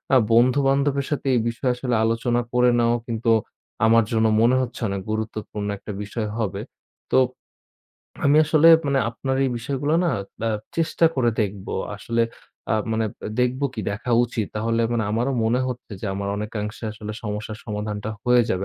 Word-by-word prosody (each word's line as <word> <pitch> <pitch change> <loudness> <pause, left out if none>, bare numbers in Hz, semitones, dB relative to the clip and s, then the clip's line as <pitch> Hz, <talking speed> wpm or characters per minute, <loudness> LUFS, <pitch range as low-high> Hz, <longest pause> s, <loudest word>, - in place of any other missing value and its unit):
আ - - +8 0.2
বন্ধু 125 +4 +5
বান্ধবের 140 0 +1
সাথে 145 -1 -2
এই - - +3
বিষয়ে 120 +2 -1
আসলে 125 -1 -1
আলোচনা 115 +2 +1
করে 125 0 +4
নেওয়াও 120 0 +2
কিন্তু 115 0 -1 0.6
আমার 115 +1 +5
জন্য 110 -1 +2 0.2
মনে 120 +3 +4
হচ্ছে 125 -1 -5
অনেক 100 0 -3
গুরুত্বপূর্ণ 110 -1 -4
একটা 105 - -8
বিষয় 105 +1 -4
হবে। 100 -2 -2 0.5
তো - - +4 1.1
আমি 145 +1 +5
আসলে 155 +1 +5 0.2
মানে 140 -1 +2
আপনার 130 +3 -2
এই 135 - +1
বিষয়গুলো 140 +5 -1
না - - +2 0.4
আ - - +2 0.3
চেষ্টা 165 0 +1
করে 120 -3 +2
দেখব। 100 -2 -3 0.3
আসলে 115 +3 0 0.5
আ - - +3 0.2
মানে 110 0 +1 0.4
দেখব 125 +2 +1
কি 110 - -3
দেখা 110 +5 -4
উচিত। 115 -3 -3
তাহলে 115 +2 0
মানে 115 -2 0
আমারও 120 +5 0
মনে 120 +3 +2
হচ্ছে 125 -3 -7
যে, - - -4
আমার 100 0 -3
অনেকাংশে 105 +1 -5
আসলে 105 0 -7
সমস্যার 105 0 -5
সমাধানটা 105 0 -4
হয়ে 125 0 +5
যাবে 95 +1 0
115 Hz, 165 wpm, -23 LUFS, 105-125 Hz, 1.1 s, আ